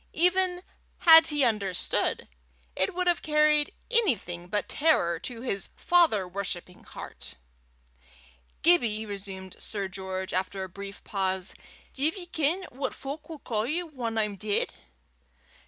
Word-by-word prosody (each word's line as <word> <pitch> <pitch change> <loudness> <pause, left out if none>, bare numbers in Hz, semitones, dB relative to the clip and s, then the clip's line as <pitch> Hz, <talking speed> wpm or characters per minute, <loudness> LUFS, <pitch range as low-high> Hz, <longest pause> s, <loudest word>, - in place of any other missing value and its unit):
Even 360 +1 +2 0.3
had 325 -1 +8
he 295 -2 +2
understood, 205 -6 0 0.5
it 190 - 0
would 365 0 0
have 350 -1 +2
carried 300 -1 +3 0.2
anything 220 - +1
but 205 +2 -1
terror 170 - +2
to 235 -2 -6
his 200 -6 -3
father 325 - +3
worshipping 180 -1 -5
heart. - - -8 1.3
"Gibbie," 235 -11 +4
resumed 195 -2 -6
Sir 200 -2 -2
George, 190 0 -5
after 190 +1 -1
a 190 - -6
brief 200 +2 -9
pause, 190 -2 -1 0.4
"div 305 +7 0
ye 360 - -7
ken 335 +2 0
what 265 +1 -3
fowk'll 300 +3 -7
ca' 220 -3 -1
ye 320 +8 -1
whan 250 -9 -4
I'm 210 -2 0
deid?" 205 +1 0
225 Hz, 130 wpm, -28 LUFS, 195-320 Hz, 1.3 s, had